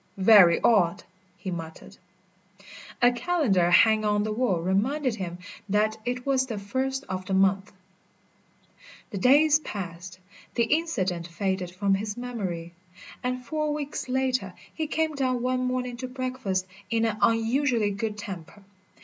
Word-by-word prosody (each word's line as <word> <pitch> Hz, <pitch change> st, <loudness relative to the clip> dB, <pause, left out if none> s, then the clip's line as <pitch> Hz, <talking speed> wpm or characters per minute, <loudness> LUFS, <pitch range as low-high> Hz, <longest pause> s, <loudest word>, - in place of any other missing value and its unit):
"Very 190 Hz, -3 st, +7 dB
odd!" 200 Hz, -4 st, +3 dB, 0.3 s
he 190 Hz, -, -5 dB
muttered. 165 Hz, -2 st, -8 dB, 1.1 s
A 245 Hz, -, +7 dB
calendar 245 Hz, -, +1 dB
hanging 215 Hz, +5 st, +5 dB
on 210 Hz, 0 st, +2 dB
the 215 Hz, -, -2 dB
wall 215 Hz, -5 st, 0 dB
reminded 230 Hz, -, 0 dB
him 175 Hz, -3 st, -5 dB, 0.3 s
that 215 Hz, +2 st, +1 dB
it 250 Hz, 0 st, -3 dB
was 265 Hz, -1 st, +1 dB
the 225 Hz, -4 st, -4 dB
first 260 Hz, +7 st, -2 dB
of 185 Hz, 0 st, -6 dB
the 190 Hz, -, 0 dB
month. 195 Hz, +1 st, +2 dB, 1.4 s
The 200 Hz, -, -4 dB
days 290 Hz, +7 st, +5 dB
passed, 185 Hz, -, -7 dB, 0.4 s
the 235 Hz, -, +3 dB
incident 225 Hz, -, -1 dB
faded 190 Hz, 0 st, -2 dB
from 195 Hz, +2 st, 0 dB
his 205 Hz, +2 st, -2 dB
memory, 190 Hz, -9 st, -5 dB, 0.5 s
and 250 Hz, 0 st, -3 dB
four 305 Hz, +3 st, -1 dB
weeks 290 Hz, -3 st, -5 dB
later 255 Hz, -7 st, -1 dB, 0.2 s
he 315 Hz, -1 st, -3 dB
came 315 Hz, 0 st, 0 dB
down 255 Hz, -3 st, -1 dB
one 255 Hz, 0 st, 0 dB
morning 250 Hz, -1 st, -2 dB
to 255 Hz, +1 st, -5 dB
breakfast 255 Hz, -7 st, -3 dB, 0.2 s
in 230 Hz, 0 st, +1 dB
an 220 Hz, -2 st, -1 dB
unusually 230 Hz, -1 st, +2 dB
good 210 Hz, +1 st, -3 dB
temper. 195 Hz, -1 st, -8 dB
220 Hz, 140 wpm, -26 LUFS, 190-255 Hz, 1.4 s, Very